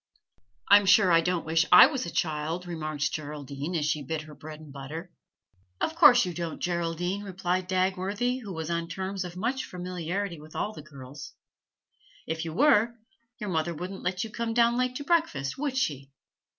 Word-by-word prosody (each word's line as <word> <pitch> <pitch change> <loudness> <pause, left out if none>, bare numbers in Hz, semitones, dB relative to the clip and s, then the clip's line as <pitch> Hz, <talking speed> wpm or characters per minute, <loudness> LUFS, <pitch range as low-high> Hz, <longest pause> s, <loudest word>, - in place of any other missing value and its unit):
'I'm 205 0 +7
sure 190 -1 +6
I 165 0 +6
don't 175 0 -1
wish 160 +1 +3
I - - +11
was 270 - -2
a - - -3
child,' 160 +2 -2
remarked 155 -5 -2
Geraldine, 145 +1 -5
as 155 -3 0
she 150 0 0
bit 155 +3 -4
her 155 -1 -12
bread 155 +1 -10
and 155 -3 -12
butter. 155 +6 -7 0.7
'Of - - -1
course 255 - +7
you 180 - -4
don't, 170 -1 -4
Geraldine,' 175 +2 -2
replied 185 -1 -2
Dagworthy, 190 +6 0
who 205 -4 -7
was 160 -1 -4
on 170 0 -1
terms 190 +2 -4
of 180 0 -8
much 245 +7 -1
familiarity 180 0 -4
with 155 +1 -14
all 215 - -2
the 155 - -9
girls. 140 -1 -11 0.9
'If 160 +1 -3
you 165 - -4
were, 235 - +4 0.4
your 210 -5 -4
mother 165 0 -1
wouldn't 185 +4 -6
let 180 +1 -1
you 225 - -7
come 230 0 -3
down 235 0 +4
late 255 0 0
to 285 - -4
breakfast, 285 - 0
would 280 -3 -2
she?' 140 - -1
175 Hz, 185 wpm, -28 LUFS, 155-205 Hz, 0.9 s, I